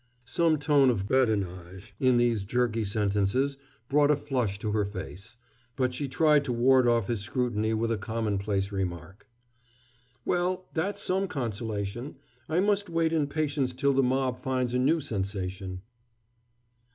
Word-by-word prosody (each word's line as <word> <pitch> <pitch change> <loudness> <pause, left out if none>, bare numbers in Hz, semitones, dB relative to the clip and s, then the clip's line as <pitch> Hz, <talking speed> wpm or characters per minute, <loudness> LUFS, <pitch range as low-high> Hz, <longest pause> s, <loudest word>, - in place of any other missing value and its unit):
Some 160 +4 +2
tone 145 -2 +4
of 100 -5 0
badinage 100 -5 -1
in 130 -2 +4
these 120 -4 +2
jerky 115 +1 0
sentences 105 +6 0 0.3
brought 145 +1 +3
a 150 - +5
flush 125 -8 -2
to 105 +1 -3
her 105 0 +1
face, 100 +3 -8 0.4
but 130 -1 0
she 140 +3 -3
tried 150 +2 +3
to 125 - -2
ward 125 +1 +4
off 115 -3 +3
his 115 -3 -1
scrutiny 110 0 -1
with 115 +1 0
a 110 - -1
commonplace 100 -2 -1
remark. 95 +1 -5 1.0
"Well, 180 +1 0
that's 200 +5 -2
some 190 +1 0
consolation. 115 - -4 0.3
I 165 +3 +2
must 205 -1 +1
wait 165 -1 +1
in 155 -3 +1
patience 145 -3 -1
till 140 +2 +1
the 135 - +3
mob 130 -1 0
finds 130 -2 -1
a 125 - +2
new 150 +6 +3
sensation." 95 -6 -4
120 Hz, 150 wpm, -28 LUFS, 100-140 Hz, 1.0 s, a